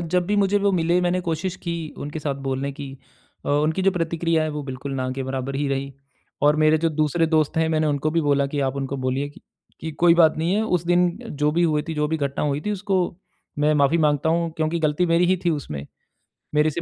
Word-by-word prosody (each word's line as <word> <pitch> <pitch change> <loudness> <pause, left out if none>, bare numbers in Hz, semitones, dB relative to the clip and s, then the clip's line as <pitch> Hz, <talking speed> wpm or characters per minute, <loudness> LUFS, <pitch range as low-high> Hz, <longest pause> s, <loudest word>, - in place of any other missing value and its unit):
जब 175 +1 0
भी 205 - 0
मुझे 200 0 +3
वो 200 0 +2
मिले, 175 0 +2
मैंने 180 0 +1
कोशिश 170 +1 -2
की 170 - -2 0.3
उनके 150 +2 -5
साथ 145 -2 -2
बोलने 135 +1 -2
की। 135 -1 -8 0.5
अ, - - -4
उनकी 155 +5 +1
जो 195 - +4
प्रतिक्रियाएँ 165 -2 0
हैं - - -2
वो 150 - -3
बिल्कुल 135 +1 -6
ना 130 -1 -2
के 135 0 -4
बराबर 130 +1 -4
ही 145 0 -1
रही 135 0 -2 0.5
और 150 +1 +5
मेरे 155 0 +4
जो 165 - +1
दूसरे 155 +1 +1
दोस्त 155 -1 +1
हैं, 160 0 +2
मैंने 155 -1 +1
उनको 145 +1 0
भी 165 - +1
बोला 140 -2 +2
कि 145 +1 -3
आप 135 0 -1
उनको 140 0 -3
बोलिए 130 +2 -1
कि 145 - -16 0.4
कि 160 - -4
कोई 170 +2 +4
बात 160 -3 +5
नहीं 170 +4 +1
है, 215 - +2
उस 180 -6 0
दिन 175 0 +4 0.2
जो 150 +1 +1
भी 175 +2 +2
हुए 155 -3 +2
थी, 160 - -2
जो 150 0 0
भी 160 - 0
घटना 140 -1 -2
हुई 145 0 0
थी 210 - -3
उसको 200 -1 0 0.6
मैं 150 +1 +3
माफी 145 +3 +3
माँगता 150 0 +2
हूँ 170 0 +1
क्योंकि 160 +1 0
गलती 155 +3 +1
मेरी 170 +1 +3
ही 185 +1 +3
थी 175 - +3
उसमें। 75 - -4 0.7
मेरे 150 +1 +4
से 170 +3 -4
155 Hz, 245 wpm, -23 LUFS, 145-170 Hz, 0.7 s, और